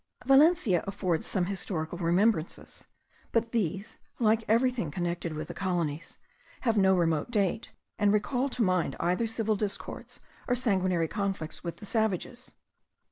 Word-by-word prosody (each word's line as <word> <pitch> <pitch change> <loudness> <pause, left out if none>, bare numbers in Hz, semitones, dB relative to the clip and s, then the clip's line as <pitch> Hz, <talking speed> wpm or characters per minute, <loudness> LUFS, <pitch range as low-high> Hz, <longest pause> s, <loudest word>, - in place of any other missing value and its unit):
Valencia 270 - +5
affords 185 -4 -1
some 185 -3 +1
historical 175 -3 -3
remembrances; 175 +1 0 0.5
but 230 0 0
these, 200 -3 -2 0.2
like 225 -1 +2
everything 230 - +2
connected 170 +1 -3
with 155 - -5
the - - -6
colonies, 170 -4 -3 0.4
have 230 -4 +1
no 190 -2 +4
remote 165 -1 +1
date, 210 -2 0 0.3
and 205 -1 +4
recall 250 +6 +1
to 250 -2 0
mind 185 -3 +1
either 180 +7 +1
civil 220 -1 0
discords 205 -1 -5 0.3
or 245 - +2
sanguinary 185 -8 +1
conflicts 195 -5 -3
with 170 -1 -5
the - - -10
savages. 220 +2 -2
195 Hz, 135 wpm, -29 LUFS, 175-225 Hz, 0.5 s, Valencia